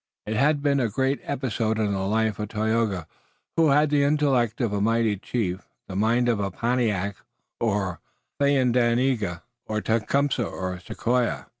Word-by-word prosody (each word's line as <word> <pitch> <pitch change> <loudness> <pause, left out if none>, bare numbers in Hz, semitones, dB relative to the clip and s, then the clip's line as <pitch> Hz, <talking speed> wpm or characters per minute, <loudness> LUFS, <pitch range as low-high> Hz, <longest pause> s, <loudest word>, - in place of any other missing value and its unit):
It 110 - -3
had 145 +5 +2
been 140 -1 +2
a 120 -3 +1
great 130 +5 0
episode 120 -5 -1
in 105 -2 0
the 95 - -1
life 110 +2 0
of 105 -1 -3
Tayoga, 110 -4 0 0.5
who 165 -1 +4
had 145 +1 +4
the 145 -1 +3
intellect 140 -6 +2
of 115 -5 0
a 100 - 0
mighty 115 0 +2
chief, 95 -2 -3 0.2
the 95 - -7
mind 115 +4 +2
of 115 -3 +2
Pontiac 110 -5 0 0.4
or 100 -6 -1 0.4
Thayendanegea, 125 -7 +2 0.2
or 110 0 -1
Tecumseh, 120 +5 +1
or 90 -3 -4
Sequoia. 120 +6 -1
115 Hz, 150 wpm, -25 LUFS, 105-130 Hz, 0.5 s, who